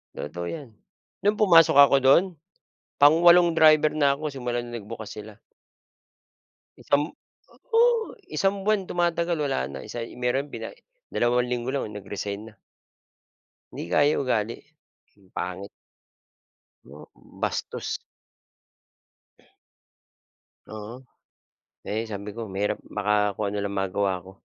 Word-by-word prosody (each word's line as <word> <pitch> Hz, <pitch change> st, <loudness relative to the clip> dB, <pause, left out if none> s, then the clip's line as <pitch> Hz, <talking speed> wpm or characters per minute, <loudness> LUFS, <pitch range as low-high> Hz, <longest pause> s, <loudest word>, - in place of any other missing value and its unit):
Totoo 85 Hz, +4 st, -5 dB
‘yan. 140 Hz, -8 st, -8 dB, 0.5 s
Nung 205 Hz, +1 st, +2 dB
pumasok 165 Hz, -8 st, +6 dB
ako 140 Hz, -1 st, +8 dB
dun, 135 Hz, +6 st, +6 dB, 0.7 s
pang 145 Hz, +3 st, +6 dB
walong 175 Hz, 0 st, +6 dB
driver 155 Hz, -2 st, +5 dB
na 140 Hz, -2 st, +2 dB
ako 150 Hz, +1 st, -4 dB
simula 120 Hz, -2 st, -3 dB
na 120 Hz, 0 st, -6 dB
nagbukas 110 Hz, 0 st, -8 dB
sila. 105 Hz, 0 st, -10 dB, 1.4 s
Isang 145 Hz, +1 st, +1 dB, 0.7 s
oo, 465 Hz, 0 st, +3 dB, 0.2 s
isang 195 Hz, 0 st, 0 dB
buwan 205 Hz, -1 st, +1 dB
tumatagal 170 Hz, -1 st, 0 dB
wala 135 Hz, -, -1 dB
na, 65 Hz, -, -7 dB
isa 115 Hz, -1 st, -5 dB, 0.2 s
meron 130 Hz, +4 st, -1 dB
bina -, -, -5 dB, 0.4 s
dalawang 125 Hz, +1 st, +1 dB
linggo 120 Hz, +1 st, -2 dB
lang 140 Hz, -6 st, -2 dB
nag-resign 100 Hz, 0 st, -6 dB
na. 115 Hz, -, -13 dB, 1.2 s
‘Di -, -, -5 dB
kaya 145 Hz, +6 st, +3 dB
ugali, 115 Hz, -4 st, -1 dB, 0.6 s
ang 95 Hz, -2 st, -24 dB
pangit. 90 Hz, +2 st, -5 dB, 1.1 s
Hmm, 70 Hz, +4 st, -13 dB, 0.4 s
bastos. -, -, -3 dB, 2.7 s
Oo, 110 Hz, +1 st, -8 dB, 0.9 s
eh, 110 Hz, +2 st, -2 dB
sabi 105 Hz, -1 st, -6 dB
ko 115 Hz, -1 st, -5 dB
mahirap 100 Hz, 0 st, -2 dB
baka 105 Hz, 0 st, 0 dB
kung 105 Hz, 0 st, -2 dB
ano 105 Hz, -, -4 dB
lang 100 Hz, -, -3 dB
magawa 95 Hz, -1 st, -1 dB
ko. 95 Hz, -, -13 dB
120 Hz, 120 wpm, -25 LUFS, 105-155 Hz, 2.7 s, ako